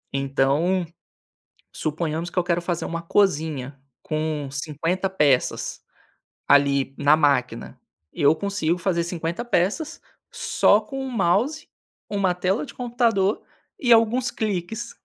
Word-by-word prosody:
Então, 140 +7 +1 0.9
suponhamos 160 +2 -3
que 180 - -4
eu 175 - +2
quero 175 -1 +1
fazer 175 -1 -3
uma 170 0 -3
cozinha, 155 -7 0 0.2
com 155 -2 -2
50 165 +6 -2
peças, 150 -9 +1 0.7
ali, 140 -1 +3
na 145 +1 +4
máquina 145 -2 0 0.4
eu 145 +2 +5
consigo 180 -2 -1
fazer 170 -2 0
50 170 +5 -3
peças, 240 - -1 0.3
só 205 - +3
com 270 +5 -6
um 260 - -5
mouse, 235 - 0 0.4
uma 195 -3 0
tela 185 +7 0
de - - -11
computador 230 -5 0 0.4
e 240 -4 +3
alguns 235 +2 +4
clicks. 220 +2 -3
175 Hz, 120 wpm, -23 LUFS, 155-210 Hz, 0.9 s, eu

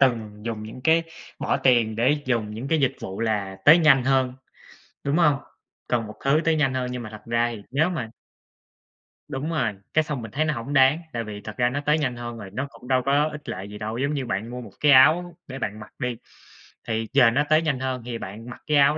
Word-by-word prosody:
từng 110 -5 +1
dùng 110 -2 -4
những 110 +4 -9
cái 165 +1 +4 0.4
bỏ - - 0
tiền 115 -4 +3
để 145 +5 +2
dùng 115 -4 0
những 120 +5 -5
cái 160 -1 +2
dịch 135 0 +1
vụ 95 +2 -6
là 105 -4 -1
tới 160 +4 +9
nhanh 140 -6 +5
hơn, 130 -1 +2 0.7
đúng 140 +3 +1
hông? 150 -5 +5 0.5
Cần 115 -3 0
một 105 - -10
thứ 140 +3 +4
tới 165 -1 +3
nhanh 135 -4 +2
hơn, 130 -1 -1
nhưng 125 -1 -5
mà 110 - -7
thật 105 0 -10
ra 115 +1 +1
thì 100 - -11
nếu 155 +6 +2
mà 155 -11 -4 1.2
Đúng 145 +2 -4
rồi, 130 -10 0 0.2
cái 155 - +4
xong 150 -4 -4
mình 110 -2 -8
thấy 155 +6 0
nó 155 - 0
hổng 130 +3 -5
đáng, 135 +3 +5
tại 115 -1 -2
vì 105 -2 -7
thật 110 - -8
ra 120 -1 +3
nó 145 +3 -3
tới 150 +1 +3
nhanh 135 -6 -1
hơn 120 -1 -6
rồi 105 -3 -8
nó 130 +5 -3
cũng 125 - -15
đâu 130 -1 +3
có 145 +2 +3
ích 150 -1 -9
lợi 95 +2 -5
gì 105 - -8
đâu. 110 +2 -4
Giống 140 +4 0
như 140 -3 -2
bạn 110 0 -3
mua 125 +1 -6
một 110 -4 -11
cái 150 - +4
áo 165 +6 +6
để 135 0 -7
bạn 105 -3 -4
mặc 105 - -11
đi, 125 -3 -2 0.7
thì 110 0 -1
giờ 125 -4 +6
nó 140 +5 +2
tới 155 +1 +5
nhanh 150 -5 -1
hơn 130 -1 -2
thì 120 -1 -4
bạn 110 +3 -8
mặc 120 - -10
cái 150 -1 +3
áo 145 +2 +5
130 Hz, 250 wpm, -24 LUFS, 115-145 Hz, 1.2 s, tới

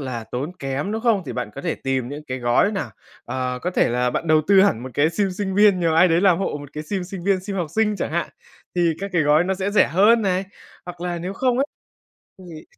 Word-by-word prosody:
là 125 -5 -5
tốn 135 +9 -5
kém, 135 +9 -3
đúng 220 - -2
không? 225 -6 +2
Thì - - -4
bạn 125 -4 -4
có - - -6
thể 170 -3 -2
tìm 130 -2 -2
những 145 +2 -8
cái 130 0 -4
gói 120 - +2
nào, 200 - -3 0.3
ờ, 125 -1 -3
có 180 - -1
thể - - +2
là 125 +1 0
bạn 170 - -3
đầu 155 -1 +4
tư 195 -1 +7
hẳn 125 - +1
một 130 - -7
cái 150 +3 +2
sim 195 +2 0
sinh 190 0 -3
viên, 205 -3 +5
nhờ 165 -2 +1
ai 180 +3 +6
đấy 165 +1 +3
làm 185 -4 +4
hộ 190 -6 -2
một 145 0 -11
cái 150 - -5
sim 185 +3 -3
sinh 185 -1 -8
viên, 195 -2 +2
sim 195 +1 -5
học 175 - -1
sinh 210 -2 +2
chẳng 165 - -3
hạn, 170 - -1 0.5
thì 170 -2 +2
các 200 0 -4
cái 170 -3 +2
gói 150 +3 +4
nó 190 +1 0
sẽ 190 +2 -2
rẻ 210 - +4
hơn 210 +8 +4
này, 190 0 0 0.4
hoặc 175 -1 -9
là 175 -1 -3
nếu 180 +3 -5
không 250 +3 0
ấy 275 - +3 0.7
thì 170 -4 -11
175 Hz, 270 wpm, -22 LUFS, 145-195 Hz, 0.7 s, tư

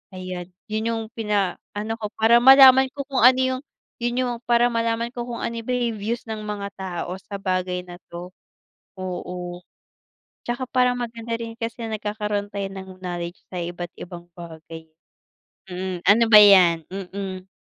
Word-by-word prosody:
ayan. 185 -1 -6 0.2
Yun 220 +1 -1
yung 225 -1 -2
pinaano 210 0 -2
ko 210 - -3
para 230 +2 +5
malaman 265 0 +9
ko 280 - -3
kung 270 -4 0
ano 255 +1 +8 0.2
yung 255 - -7 0.4
yun 240 +1 0
yung 245 - -2
para 240 0 +4
malaman 230 0 -1
ko 240 - -3
kung 240 -1 -5
ano 230 0 -3
ba 250 - -4
yung 235 -2 -1
views 230 +4 -3
ng 220 -1 -5
mga 205 -1 -4
tao 180 -2 -5
sa 200 - -7
bagay 185 -1 -1
na 175 - -9
'to, 175 +1 -8 0.7
oo. 180 -1 -5 0.8
Tsaka 240 +2 -2
parang 250 -1 +2
maganda 230 -1 -5
rin 230 -1 -7
kasi 230 0 -5
nagkakaroon 210 -1 -3
tayo 200 -1 -2
ng 190 -1 -9
knowledge 175 -1 -5
sa 185 - -7
iba't 175 0 -5
ibang 175 -1 -9
bagay. 160 -1 -10 0.8
Hmm, 185 -1 -4
ano 220 +4 +6
ba 215 -2 +10
yan? 180 -5 +6
Mm. 190 0 -6
205 Hz, 160 wpm, -23 LUFS, 180-230 Hz, 0.8 s, ba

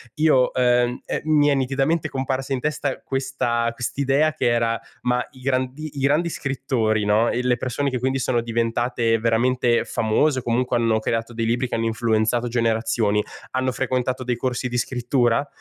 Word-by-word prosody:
io 150 -5 +3
ehm, 125 -1 +2
è - - -3
mi 150 -2 +4
è - - +4
nitidamente 135 +4 0
comparsa 135 0 -2
in 130 - -1
testa 145 -2 -2
questa 125 -3 -1
quest'idea 140 +5 0
che 155 - -2
era: 115 -1 +1 0.2
"Ma 125 0 +1
i 130 - -15
grandi 130 +3 -2
i - - -2
grandi 150 +5 +2
scrittori, 125 -8 -1
no, 105 +3 +3
e 125 - -1
le 125 -1 +2
persone 130 +3 -1
che 125 - -2
quindi 130 +2 0
sono 120 -2 0
diventate 115 0 0
veramente 120 +1 +2
famose 125 +5 +1
o - - -6
comunque 125 +1 0
hanno 115 -2 +2
creato 115 +1 -2
dei 115 0 -2
libri 120 +3 0
che - - -3
hanno 115 0 -1
influenzato 115 +1 +1
generazioni 115 -2 +1 0.3
hanno 130 0 0
frequentato 130 0 -1
dei 125 -1 -1
corsi 125 +1 -2
di 120 0 -3
scrittura?” 120 +1 +1
125 Hz, 175 wpm, -22 LUFS, 115-135 Hz, 0.3 s, mi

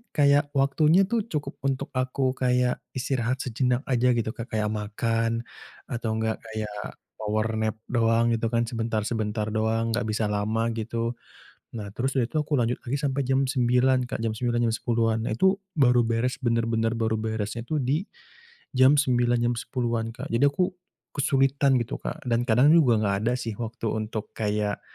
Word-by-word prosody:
kayak 145 0 +4
waktunya 150 +7 +4
tuh 230 -2 0
cukup 150 -2 -4
untuk 135 0 -2
aku 130 0 0
kayak 125 -1 +1 0.2
istirahat 130 -1 -1
sejenak 125 +1 0
aja 125 0 +3
gitu 110 -1 -1
ke 115 +1 -7
kayak 110 -2 -1
makan 115 +2 -1 0.5
atau 115 -2 -2
gak 110 0 -1
kayak 105 -2 -6 0.2
power 110 0 0
nap 110 0 0 0.2
doang 115 0 +3
gitu 115 0 -1
kan, 115 - +3
sebentar-sebentar 110 -2 -2
doang, 110 +1 0
gak 120 -1 -1
bisa 110 +1 -1
lama 110 +3 0
gitu. 115 +1 -3 0.6
Nah 100 -2 -7
terus 130 +3 -1
dari 120 - +2
itu 125 - -24
aku 150 -2 0
lanjut 120 +1 0
lagi 130 +3 -2
sampai 140 -1 0
jam 135 +1 +1
9.00 130 0 +2
Kak, - - -3
jam 110 -1 -1
9.00 120 +1 -1
jam 115 - +1
10.00-an, 115 -1 0
nah - - -1
itu 190 +6 +4 0.2
baru 125 -3 +5
beres, 115 +4 0
bener-bener 115 -1 +1
baru 110 -1 +1
beresnya 110 +1 -3
tu 155 +5 -2
di 140 +6 0 0.7
jam 130 +2 +6
9.00 120 -3 +2
jam 120 +1 +1
10.00-an 115 -2 -2
Kak, - - -7
jadi 135 +5 +4
aku 180 +6 +1 0.5
kesulitan 135 -1 +2
gitu 115 - -6
Kak 160 -2 -6
dan 120 -1 +1
kadang 125 +6 +5
juga 125 -9 +5
gak 100 -1 +1
ada 120 - +3
sih 115 -3 -4
waktu 115 0 -5
untuk 110 0 -4
kayak 105 -1 -1
120 Hz, 170 wpm, -26 LUFS, 110-130 Hz, 0.7 s, jam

